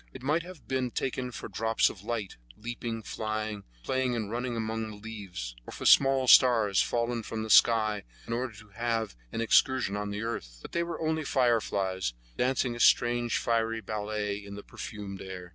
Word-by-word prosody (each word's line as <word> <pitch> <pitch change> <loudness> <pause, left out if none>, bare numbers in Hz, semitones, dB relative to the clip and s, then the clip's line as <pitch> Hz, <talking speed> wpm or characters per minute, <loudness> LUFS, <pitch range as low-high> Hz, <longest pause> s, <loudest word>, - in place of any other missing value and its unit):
It 130 - -10
might 150 +5 +2
have 180 -2 -12
been 130 -1 0
taken 130 +1 -2
for 125 - -7
drops 115 0 +2
of 95 - -5
light, 110 -3 -3 0.2
leaping, 115 0 -5
flying, 110 -1 -3 0.2
playing 130 - 0
and 110 -3 -3
running 120 0 -2
among 110 0 -2
the 105 - -8
leaves, 100 - -7
or - - -7
for - - -7
small 135 -1 +6
stars 115 -7 +6
fallen 120 0 0
from 110 0 -4
the 110 - -3
skies 110 -3 +5 0.2
in 115 - -4
order 120 -1 -2
to 105 0 -14
have 115 - -2 0.2
an 115 - -2
excursion 115 -2 +3
on 105 0 -3
the 105 +1 -3
earth; - - -5
but - - -9
they 170 - 0
were 170 0 -3
only 160 0 0
fireflies 100 - +1 0.2
dancing 125 -1 +1
a - - -8
strange 120 -1 +4
fiery 115 -1 0
ballet 105 -1 -3
in 100 0 -8
the 100 - -8
perfumed 100 -3 -7
air. 90 -2 -7
115 Hz, 185 wpm, -29 LUFS, 105-120 Hz, 0.2 s, small